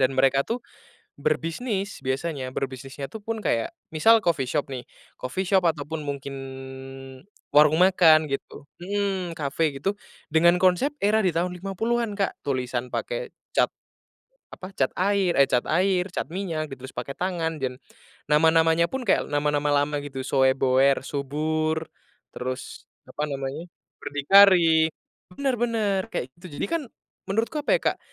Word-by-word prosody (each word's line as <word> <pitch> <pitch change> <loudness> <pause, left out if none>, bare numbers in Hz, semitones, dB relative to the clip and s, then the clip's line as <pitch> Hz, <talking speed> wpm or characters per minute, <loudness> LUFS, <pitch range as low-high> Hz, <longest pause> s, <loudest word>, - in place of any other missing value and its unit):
dan 130 - +2
mereka 135 +1 +3
tuh, 235 +2 -3 0.6
berbisnis 190 - -2
biasanya 135 0 -2
berbisnisnya 135 +1 -5
tuh 220 - -8
pun 225 +1 -3
kayak 115 -8 0 0.2
misal 225 +8 +5
coffee 145 -7 +1
shop 140 0 -1
nih 125 - -4 0.4
coffee 185 +10 -3
shop 190 +1 +3
atau 150 -3 -3
pun 160 0 -5
mungkin 140 -1 -5 1.2
warung 150 +1 +6
makan 165 -4 +6
gitu, 135 +1 -5 0.2
mhm, 190 -3 -2
cafe 150 +1 -1
gitu 195 +7 0 0.4
dengan 170 +2 +5
konsep 185 +11 +2
era 215 +2 +4
di 185 - +2
tahun 180 +2 0
50-an 210 +4 -2
Kak 195 - -2
tulisan 125 -2 -2
pakai - - -3 0.3
cat, - - +4 0.9
apa 190 +1 -10
cat 130 - +1
air, 195 -1 +2
eh, 140 - +7
cat 125 -1 +3
air 185 +2 +2
cat - - -3
minyak 165 -6 -3
gitu 130 - -9
ditulis - - -15
pakai 140 - -4
tangan 165 -4 -2
dan, 130 -1 -3 0.5
nama-namanya 160 +2 +4
pun 265 -1 -3
kayak - - +2
nama-nama 145 0 +1
lama 145 +1 +1
gitu 135 -2 -6
soeboer 130 0 +3
subur 155 +3 -1 0.5
terus 130 +1 -6 0.2
apa 150 +1 -3
namanya 140 +4 -5 0.3
berdikari 165 +1 +5 0.5
bener 275 -2 0
bener 220 -5 +1
kayak 130 - -4
gitu 175 -5 -10
jadi - - -1
kan - - -7 0.5
menurutku 225 +9 0
apa 295 - -3
ya - - -6
Kak, - - -19
160 Hz, 145 wpm, -25 LUFS, 140-190 Hz, 1.2 s, eh